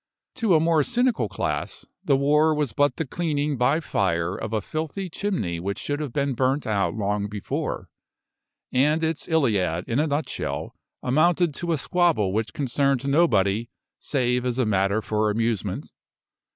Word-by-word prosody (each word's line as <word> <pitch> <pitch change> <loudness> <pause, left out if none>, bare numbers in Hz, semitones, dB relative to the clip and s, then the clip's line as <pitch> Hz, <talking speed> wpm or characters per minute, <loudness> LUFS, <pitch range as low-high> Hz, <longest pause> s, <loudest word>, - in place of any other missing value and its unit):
To 225 -8 +3
a - - +5
more 165 -1 +3
cynical 240 - +1
class, - - -3 0.2
the 135 - +3
war 150 +3 +3
was 145 -7 -1
but 145 +5 +2
the 160 - -2
cleaning 150 -1 -1
by 135 +5 +2
fire 90 - 0
of 110 - -5
a 110 - +1
filthy 160 - -4
chimney 165 - -2
which 100 +3 -3
should 145 0 -3
have 150 -4 -4
been 140 +1 0
burnt 130 +3 0
out 100 -5 0
long 105 -1 -1
before, 105 -1 -4 0.8
and 150 +5 +2
its 160 -1 -1
Iliad 105 - +1
in 120 +4 0
a 155 - +2
nutshell 145 +1 -3 0.3
amounted 165 +5 +3
to 170 +4 -3
a 160 - +2
squabble 160 - +2
which 110 -1 -1
concerned 140 +2 0
nobody 115 - +2 0.3
save 125 -3 0
as 125 -1 -1
a 130 - +2
matter 100 +1 +1
for 110 0 0
amusement. 115 -1 -2
135 Hz, 160 wpm, -24 LUFS, 105-155 Hz, 0.8 s, a